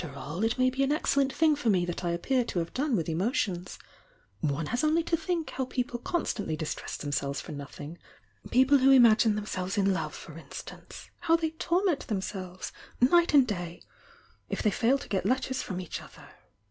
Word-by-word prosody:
A/T - - -4
T°" - - -12
"""^t - - -12
not 140 +1 -8
worry - - -4
about 230 - -2
me 255 - +3
in 265 +2 +1
the 295 - +3
least - - 0
dpnr 285 +2 +2
lor 230 - +3
me 180 -3 +2
that 175 +1 -4
I 175 - 0
appear 245 +10 +1
to 230 - -5
have 170 -1 -2
done 275 -1 0
with 165 -6 -1
emotions' 180 - -1 0.6
One 150 0 -1
has 245 - -1
only 315 +2 +3
to 335 - +1
think 330 0 -2
how 260 - -2
people 245 -1 -3
constantlv 210 - -2
riil 155 - -2
tress - - -6
themselves 140 -1 -2
for - - -8
nothing 145 +3 -8 0.5
I'^Xple 265 +3 +5
who" 265 0 +7
marine 230 -3 +8 0.2
themse 205 -3 -3
ves 190 +4 -3
in 195 -1 +3
love, 190 - -3
for - - -10
instaT>ce! - - -10
how 330 - +3
they 325 -1 0
ZmZ 345 +1 0
themselves 190 -3 -4 0.3
night 335 +5 +4
and 275 -3 +7
day! 175 -6 -5 0.7
if - - -3
they 210 - +3
fa 225 - -1
1 270 +3 +5
t^ - - -10
Jt 195 - 0
W 255 +8 +2
ters 260 0 -3
from 185 -2 -4
each 180 - -5
other! - - -14
230 Hz, 220 wpm, -29 LUFS, 175-275 Hz, 0.7 s, marine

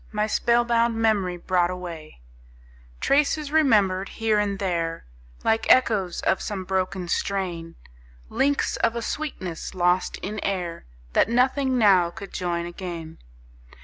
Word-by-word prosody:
My 210 0 0
spell 235 +2 +2
bound 235 0 +2
memory 205 -5 +1
brought 175 0 +1
away; 170 - -8 0.8
Traces, 295 +1 +1
remembered 205 -11 +3
here 220 -2 0
and 200 -1 -1
there, 170 -4 -2 0.4
Like 225 0 +2
echoes 210 -8 +3
of - - +1
some 200 -3 -4
broken 185 -1 -2
strain; 170 -3 -2 0.5
Links 280 - 0
of 230 - +1
a 235 - -3
sweetness 190 - -5
lost 180 0 +1
in 210 +2 -4
air, 180 - -3 0.3
That - - +3
nothing 260 +2 +2
now 190 -6 +5
could 195 +3 -10
join 170 -1 -2
again. 170 -2 -7
195 Hz, 130 wpm, -24 LUFS, 175-230 Hz, 0.8 s, now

